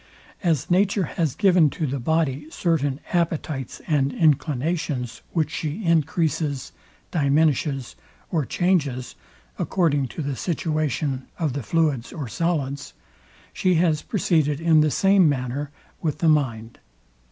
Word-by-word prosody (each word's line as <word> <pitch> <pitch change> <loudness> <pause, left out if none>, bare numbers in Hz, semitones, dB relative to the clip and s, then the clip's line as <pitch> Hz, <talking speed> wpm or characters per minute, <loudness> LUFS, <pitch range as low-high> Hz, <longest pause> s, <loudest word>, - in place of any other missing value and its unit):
As 165 -4 0
nature 195 +2 +3
has 155 -4 -1
given 180 -6 +4
to 155 - -3
the 135 0 -2
body 150 +1 0
certain 150 -5 0
appetites 160 -6 -2
and 140 -3 +1
inclinations, 150 -3 0
which 155 -3 0
she 160 +8 -4
encreases, 160 -3 0 0.4
diminishes, 145 -3 +1 0.4
or 160 -4 +1
changes 145 -7 0 0.5
according 145 -7 +1
to 155 - -6
the 140 -1 -2
situation 155 -5 -2
of 155 -6 -1
the 140 - -3
fluids 145 -2 0
or 145 -6 -5
solids; 140 - -2 0.6
she 185 -2 +2
has 160 -2 +2
proceeded 155 -8 +1
in 165 -2 +4
the 155 - +3
same 195 +3 +4
manner 135 +1 -2 0.3
with 155 -4 -1
the 165 - +1
mind. 120 -7 0
155 Hz, 125 wpm, -24 LUFS, 140-165 Hz, 0.6 s, given